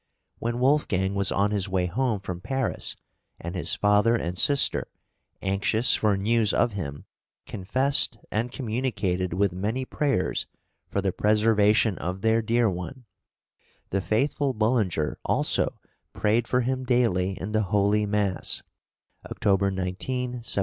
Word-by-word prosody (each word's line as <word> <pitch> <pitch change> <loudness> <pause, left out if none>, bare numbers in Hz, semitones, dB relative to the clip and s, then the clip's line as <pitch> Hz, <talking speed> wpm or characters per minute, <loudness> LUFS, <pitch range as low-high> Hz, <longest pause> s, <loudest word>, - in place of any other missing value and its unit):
When 120 +1 -2
Wolfgang 125 -8 +1
was 100 -1 0
on 100 +1 +1
his 100 -2 -1
way 95 -1 0
home 110 +2 -1
from 90 -2 -6
Paris, 135 +2 -2 0.4
and 85 +1 -6
his 90 - +1
father 105 +3 +3
and 90 -5 -3
sister, 140 +9 +4 0.6
anxious 100 +5 +3
for 105 -2 +2
news 110 +1 +1
of 120 - +2
him, 70 -8 -6 0.4
confessed 130 +6 +1
and 115 +3 -1
communicated 110 -8 -2
with 100 0 +1
many 110 +8 -2
prayers 135 -9 -1 0.4
for 100 - -2
the 95 -1 0
preservation 105 0 +2
of 90 +2 -4
their 110 +1 +2
dear 115 +1 +2
one, 100 +8 -5 0.9
"the 95 - 0
faithful 135 +6 0
Bullinger" 110 -9 0
also - - +1 0.3
"prayed 110 +2 +1
for 125 - +1
him 130 +1 -2
daily 100 -7 +1
in 95 - -5
the 110 0 +1
holy 105 +2 +1
mass" 100 -3 -1 0.7
(October 100 -2 +1
19, 95 -1 -3 0.3
1778). 120 -4 -2
105 Hz, 135 wpm, -25 LUFS, 95-120 Hz, 0.9 s, sister